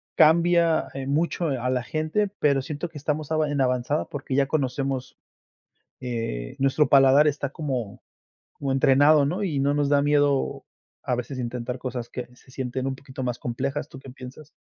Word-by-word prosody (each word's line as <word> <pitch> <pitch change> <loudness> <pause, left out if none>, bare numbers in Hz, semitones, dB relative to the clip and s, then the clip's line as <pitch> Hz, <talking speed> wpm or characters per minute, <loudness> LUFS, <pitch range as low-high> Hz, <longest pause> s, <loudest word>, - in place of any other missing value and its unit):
cambia, 170 +1 +4
eh 135 -1 -5
mucho 165 +4 0
a 125 -3 -1
la 125 -1 0
gente, 155 +10 -1
pero 140 -2 +3
siento 150 +5 -5
que 160 - -11
estamos 150 +1 -3
a - - +2
en 145 -1 0
avanzada 125 +3 0
porque 140 -2 -5
ya 140 0 +3
conocemos, 135 -2 -2 0.8
eh, 115 - -4
nuestro 135 +2 +2
paladar 135 +2 +6
está 145 -2 -2
como 130 -9 -4 0.5
como 140 -1 -3
entrenado, 140 +3 +5
¿no? 180 +8 -2
Y 155 -8 -1
no 140 +1 +2
nos 145 -1 +1
da 145 -1 +4
miedo 145 -1 +1 0.4
a - - -1
veces 125 +2 -5
intentar 125 0 -4
cosas 125 -2 -5
que 125 - -6
se 125 - -22
sienten 130 0 -3
un 135 - -2
poquito 135 0 -9
más 125 -1 -2
complejas, 135 +4 -3
¿tú 135 - -11
qué 135 - -12
piensas? 130 +4 -11
135 Hz, 175 wpm, -25 LUFS, 130-150 Hz, 0.8 s, paladar